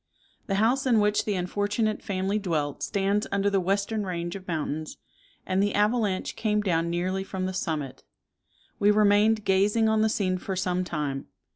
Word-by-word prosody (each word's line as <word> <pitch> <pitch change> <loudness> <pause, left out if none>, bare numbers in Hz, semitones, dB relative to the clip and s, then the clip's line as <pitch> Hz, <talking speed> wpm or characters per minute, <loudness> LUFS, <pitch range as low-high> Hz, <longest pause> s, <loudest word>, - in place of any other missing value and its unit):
The 195 - 0
house 245 +7 +2
in 235 -4 +4
which 210 0 +2
the 210 - 0
unfortunate 205 +4 -1
family 195 +1 -1
dwelt 155 -7 -2
stands 200 +1 0
under 200 0 +1
the 195 - +2
western 200 +3 0
range 175 -2 -4
of 190 -1 -9
mountains, 155 -2 -3 0.5
and 185 +1 +1
the 205 0 +1
avalanche 210 -2 +1
came 210 -1 0
down 170 -4 0
nearly 185 +3 -1
from 190 -1 -4
the 185 - -3
summit. 155 -7 -3 0.8
We 205 - +4
remained 210 +1 +4
gazing 205 +4 +3
on 220 0 +2
the 220 - +3
scene 185 -4 0
for 190 +1 -4
some 185 -1 0
time. 150 -6 -3
195 Hz, 170 wpm, -26 LUFS, 180-210 Hz, 0.8 s, in